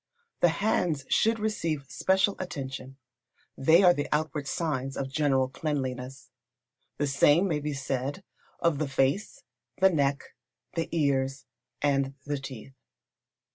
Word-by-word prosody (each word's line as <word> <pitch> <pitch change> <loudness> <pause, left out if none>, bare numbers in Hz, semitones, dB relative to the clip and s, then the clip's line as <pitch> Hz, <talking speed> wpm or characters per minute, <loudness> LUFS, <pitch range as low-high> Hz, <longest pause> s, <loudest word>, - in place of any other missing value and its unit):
The 175 - +5
hands 170 -6 0
should 225 +1 +3
receive 165 -10 -2
special 190 +5 +2
attention. 135 -6 -6 0.6
They 160 +7 +5
are 180 -1 +7
the 145 -3 -3
outward 150 -2 -1
signs 135 -4 -2
of 135 -1 -3
general 135 -3 +2
cleanliness. 130 -2 -4 0.7
The 145 - +1
same 145 +6 +4
may 155 -5 0
be 150 0 -3
said 135 +5 -3 0.4
of 170 -4 +1
the 155 - 0
face, 135 +10 0 0.4
the 190 0 +6
neck, 140 -3 0 0.4
the 165 -1 -2
ears, 135 -4 0 0.4
and 140 -1 +1
the 145 -1 -2
teeth. 135 -1 -9
145 Hz, 130 wpm, -28 LUFS, 135-165 Hz, 0.7 s, are